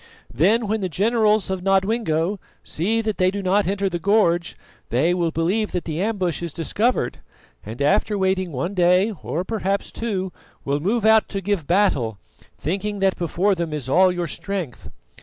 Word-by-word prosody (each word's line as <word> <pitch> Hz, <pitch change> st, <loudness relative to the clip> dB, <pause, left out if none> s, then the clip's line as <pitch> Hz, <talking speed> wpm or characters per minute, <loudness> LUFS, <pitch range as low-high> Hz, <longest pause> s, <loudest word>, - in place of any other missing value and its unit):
Then 205 Hz, -, +3 dB
when 215 Hz, +1 st, -1 dB
the 185 Hz, -, -1 dB
generals 215 Hz, +3 st, +2 dB
of 190 Hz, -1 st, -2 dB
Nodwengo 195 Hz, -2 st, +1 dB, 0.2 s
see 215 Hz, +8 st, -1 dB
that 215 Hz, -2 st, -3 dB
they 185 Hz, 0 st, +4 dB
do 200 Hz, +1 st, -4 dB
not 195 Hz, +2 st, +2 dB
enter 195 Hz, +1 st, 0 dB
the 175 Hz, -2 st, -2 dB
gorge, 175 Hz, -3 st, +2 dB, 0.3 s
they 140 Hz, -, +2 dB
will 175 Hz, -2 st, 0 dB
believe 180 Hz, +7 st, -1 dB
that 180 Hz, -, -2 dB
the 160 Hz, +1 st, -3 dB
ambush 190 Hz, -6 st, -1 dB
is 170 Hz, -3 st, -5 dB
discovered, 200 Hz, -, -1 dB, 0.4 s
and, 110 Hz, +4 st, -8 dB
after 200 Hz, +8 st, +2 dB
waiting 190 Hz, -2 st, 0 dB
one 165 Hz, +8 st, -3 dB
day 180 Hz, +3 st, +3 dB
or 170 Hz, -, -2 dB
perhaps 200 Hz, -1 st, -2 dB
two, 190 Hz, -6 st, -3 dB, 0.3 s
will 140 Hz, +1 st, 0 dB
move 210 Hz, +7 st, 0 dB
out 220 Hz, 0 st, +5 dB
to 195 Hz, -, -3 dB
give 195 Hz, -5 st, -2 dB
battle, 140 Hz, -, +2 dB, 0.4 s
thinking 200 Hz, +5 st, -3 dB
that 195 Hz, -1 st, +2 dB
before 180 Hz, +4 st, +1 dB
them 170 Hz, -3 st, -3 dB
is 150 Hz, -4 st, -4 dB
all 185 Hz, +7 st, +4 dB
your 175 Hz, -1 st, -2 dB
strength. 180 Hz, -, -5 dB
190 Hz, 175 wpm, -22 LUFS, 170-205 Hz, 0.4 s, out